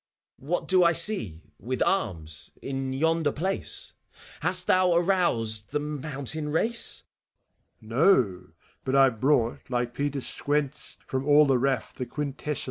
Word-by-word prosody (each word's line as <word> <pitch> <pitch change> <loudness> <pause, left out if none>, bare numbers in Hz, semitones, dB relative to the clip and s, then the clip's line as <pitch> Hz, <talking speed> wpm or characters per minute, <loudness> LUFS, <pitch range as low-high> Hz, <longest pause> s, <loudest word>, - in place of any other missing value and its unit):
What 160 +7 -3
do 185 -1 +5
I 170 0 +4
see, 160 - 0 0.2
with 130 +1 -2
arms, 80 - -3
in 135 -1 -4
yonder 160 +2 +1
place 190 +7 -1 0.2
f - - -19
Hast 180 +3 0
thou 185 -2 +3
aroused 145 - +1
the 150 - -1
mountain 150 0 -3
race 230 +10 +2 0.8
T - - -16
MEPHISTOPHELES. 125 - +2
No! 95 -7 -2 0.4
But 130 +1 -1
I've 135 -5 +4
brought, 130 -4 +1
like 120 -1 -2
Peter 140 +1 -2
Squence, 145 +1 -3
From 130 +1 -3
all 150 +1 +6
the 135 -3 +2
raff 135 0 -1
the 125 - -6
quintessence. 150 0 -4
140 Hz, 145 wpm, -26 LUFS, 125-165 Hz, 0.8 s, all